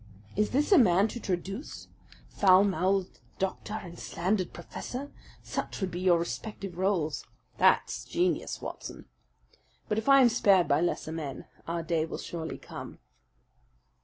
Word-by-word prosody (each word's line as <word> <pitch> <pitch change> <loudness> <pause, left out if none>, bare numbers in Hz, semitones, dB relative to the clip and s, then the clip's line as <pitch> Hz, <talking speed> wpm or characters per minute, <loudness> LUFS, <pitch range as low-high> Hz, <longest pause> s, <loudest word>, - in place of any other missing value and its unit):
Is 210 +1 +2
this 290 +8 +1
a 385 - +8
man 195 -3 +5
to 240 - -6
traduce? 195 - -4 0.4
Foul 190 -1 +5
mouthed 190 0 0 0.2
doctor 195 +2 -3
and 175 -5 -7
slandered 185 +1 -1
professor 255 +10 -7 0.3
such - - -4
would 190 -2 -2
be 175 - -4
your 180 -2 +4
respective 195 +2 -5
roles! 180 -6 0 0.4
That's - - +3
genius, 355 +2 -1
Watson. - - -7 0.8
But 210 - 0
if 225 - -2
I 275 0 +8
am 245 - +7
spared 200 -6 +4
by 145 +3 +3
lesser 175 -2 -1
men, 155 -4 -5 0.2
our 170 0 -2
day 160 -1 0
will - - -5
surely 160 -2 -5
come." - - -9
190 Hz, 145 wpm, -29 LUFS, 170-215 Hz, 0.8 s, a